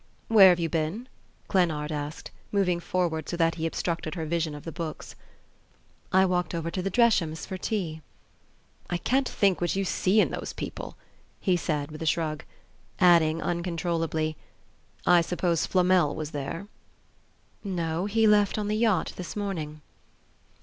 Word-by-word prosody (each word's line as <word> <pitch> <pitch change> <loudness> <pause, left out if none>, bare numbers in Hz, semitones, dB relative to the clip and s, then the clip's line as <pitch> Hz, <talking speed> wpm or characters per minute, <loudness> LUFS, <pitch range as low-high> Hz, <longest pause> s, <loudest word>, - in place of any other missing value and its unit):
"Where 205 -4 +9
have 175 -1 +3
you 165 - 0
been?" 165 +9 -2 0.4
Glennard 160 -6 +1
asked, 150 +1 -5 0.2
moving 185 -4 +1
forward 170 -3 -1
so 175 - -3
that 165 -1 +3
he 165 -1 -2
obstructed 165 0 -3
her 165 -3 -3
vision 160 -1 -1
of 145 - -9
the 165 - -6
books. 165 -2 -6 1.0
"I 190 +1 +5
walked 180 -1 0
over 165 0 -3
to 185 - -2
the 195 - -1
Dreshams 190 -8 +2
for 190 - -5
tea." 180 -5 -3 0.9
"I 175 - 0
can't 260 +8 +1
think 195 -4 +2
what 175 - 0
you 195 0 0
see 190 +3 +2
in - - +3
those - - -5
people," - - -7 0.4
he 185 -3 +2
said 150 -4 -2
with 155 - -9
a 160 - -2
shrug; 155 -1 0 0.6
adding, 165 -3 +4
uncontrollably 165 -2 -1 0.7
"I 175 -1 +6
suppose 170 -1 0
Flamel 180 -4 +3
was 155 -1 -5
there?" 145 +6 -5 1.0
"No; 175 -2 -2
he 225 +2 +2
left 210 -1 +4
on 210 -1 -2
the 215 - 0
yacht 220 -6 +1
this 180 - -6
morning." 160 -7 -4
175 Hz, 155 wpm, -27 LUFS, 160-190 Hz, 1.0 s, Where